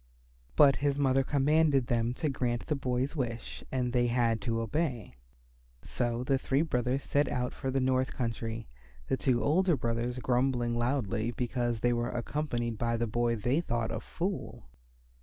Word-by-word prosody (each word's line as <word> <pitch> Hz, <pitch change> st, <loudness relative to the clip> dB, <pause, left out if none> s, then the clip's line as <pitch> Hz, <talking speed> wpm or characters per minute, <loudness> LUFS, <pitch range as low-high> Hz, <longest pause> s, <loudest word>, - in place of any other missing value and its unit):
But 135 Hz, -, +6 dB
his 140 Hz, 0 st, 0 dB
mother 135 Hz, -1 st, +3 dB
commanded 145 Hz, 0 st, +3 dB
them 120 Hz, 0 st, 0 dB
to 155 Hz, -, -1 dB
grant 125 Hz, -4 st, -1 dB
the 150 Hz, -, 0 dB
boy's 130 Hz, +1 st, -1 dB
wish 120 Hz, -5 st, -4 dB
and 125 Hz, -2 st, -1 dB
they 120 Hz, -1 st, +3 dB
had 115 Hz, -2 st, +1 dB
to 115 Hz, +2 st, -1 dB
obey. 120 Hz, -, -2 dB, 0.7 s
So 120 Hz, 0 st, -2 dB
the 135 Hz, +1 st, +1 dB
three 135 Hz, +3 st, +1 dB
brothers 125 Hz, -2 st, 0 dB
set 145 Hz, 0 st, +1 dB
out 125 Hz, 0 st, -2 dB
for 135 Hz, -, -4 dB
the 135 Hz, +1 st, +1 dB
north 130 Hz, 0 st, +1 dB
country, 115 Hz, -1 st, -3 dB, 0.4 s
the -, -, +3 dB
two 125 Hz, -3 st, +1 dB
older 175 Hz, +2 st, +3 dB
brothers 120 Hz, +1 st, -2 dB
grumbling 125 Hz, -1 st, +1 dB
loudly 120 Hz, -2 st, 0 dB
because 120 Hz, -2 st, -2 dB
they 120 Hz, 0 st, +3 dB
were 120 Hz, 0 st, -1 dB
accompanied 120 Hz, -3 st, -2 dB
by 115 Hz, 0 st, 0 dB
the 120 Hz, -, 0 dB
boy 120 Hz, +1 st, 0 dB
they 120 Hz, +8 st, +1 dB
thought 120 Hz, -8 st, -2 dB
a 115 Hz, -, -2 dB
fool. 180 Hz, -, -4 dB
125 Hz, 165 wpm, -30 LUFS, 120-135 Hz, 0.7 s, But